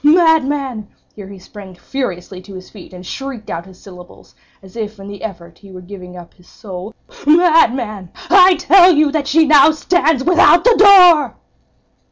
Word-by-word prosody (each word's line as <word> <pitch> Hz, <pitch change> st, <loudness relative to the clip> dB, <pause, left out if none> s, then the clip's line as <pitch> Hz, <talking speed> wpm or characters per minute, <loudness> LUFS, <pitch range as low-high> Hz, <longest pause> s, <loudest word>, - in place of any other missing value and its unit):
Madman!"—here 285 Hz, -, -2 dB
he 200 Hz, 0 st, -13 dB
sprang 190 Hz, 0 st, -15 dB
furiously 185 Hz, -3 st, -8 dB
to 195 Hz, +1 st, -15 dB
his 185 Hz, 0 st, -13 dB
feet, 200 Hz, -5 st, -16 dB
and 180 Hz, 0 st, -14 dB
shrieked 265 Hz, -1 st, -9 dB
out 170 Hz, +2 st, -8 dB
his 185 Hz, -1 st, -19 dB
syllables, 180 Hz, -2 st, -17 dB, 0.3 s
as 190 Hz, +1 st, -18 dB
if 215 Hz, -2 st, -8 dB
in 195 Hz, -, -12 dB
the 200 Hz, -2 st, -12 dB
effort 170 Hz, -5 st, -11 dB
he 200 Hz, -1 st, -18 dB
were 185 Hz, -, -12 dB
giving 180 Hz, -1 st, -13 dB
up 175 Hz, -1 st, -15 dB
his 180 Hz, -2 st, -26 dB
soul—"_Madman! 230 Hz, -, -2 dB, 0.2 s
I 370 Hz, -1 st, +5 dB
tell 370 Hz, 0 st, +3 dB
you 300 Hz, -3 st, 0 dB
that 295 Hz, -2 st, -4 dB
she 320 Hz, +2 st, +1 dB
now 300 Hz, 0 st, +4 dB
stands 315 Hz, -3 st, -1 dB
without 350 Hz, 0 st, +3 dB
the 480 Hz, -1 st, +3 dB
door! 365 Hz, -6 st, +4 dB
225 Hz, 165 wpm, -14 LUFS, 185-315 Hz, 0.3 s, I